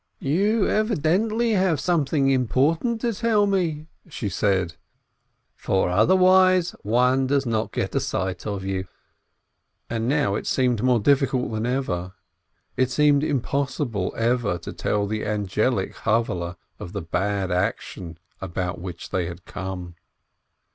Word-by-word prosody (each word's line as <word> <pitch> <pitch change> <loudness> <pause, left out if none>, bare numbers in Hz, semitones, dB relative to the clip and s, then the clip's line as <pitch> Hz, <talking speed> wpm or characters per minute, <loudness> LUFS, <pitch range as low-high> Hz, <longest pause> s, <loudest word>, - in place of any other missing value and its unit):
"You 200 +9 +1
evidently 215 +3 +1
have 185 -7 +2
something 145 -3 +1
important 150 - +1
to 235 -2 0
tell 215 -1 +2
me," 170 -6 0 0.2
she 110 -9 -4
said, 95 -1 0 0.8
"for 95 -2 0
otherwise 185 - +4
one 125 +4 +2
does 140 0 +1
not 110 -2 -1
get - - -2
a - - +2
sight 95 +2 -3
of 100 -2 -3
you." 95 -1 -3 1.0
And 115 -1 -1
now 135 -6 +1
it 105 - -3
seemed 125 -4 +1
more 125 -1 +3
difficult 135 +1 +2
than 110 +1 -2
ever, 95 -9 -2 0.6
it 130 -1 +1
seemed 145 +1 +3
impossible 140 - -1
ever 115 -5 +1
to - - -8
tell 105 -1 -1
the 105 +1 -3
angelic 105 +1 0
Chavvehle 90 -6 -1 0.2
of 90 - -8
the 100 -4 -4
bad 95 +2 -1
action 90 -2 -3 0.2
about 90 -1 -3
which 90 -1 -7
they 90 -3 0
had 85 0 -9
come. 95 -2 -6
125 Hz, 135 wpm, -24 LUFS, 95-155 Hz, 1.0 s, otherwise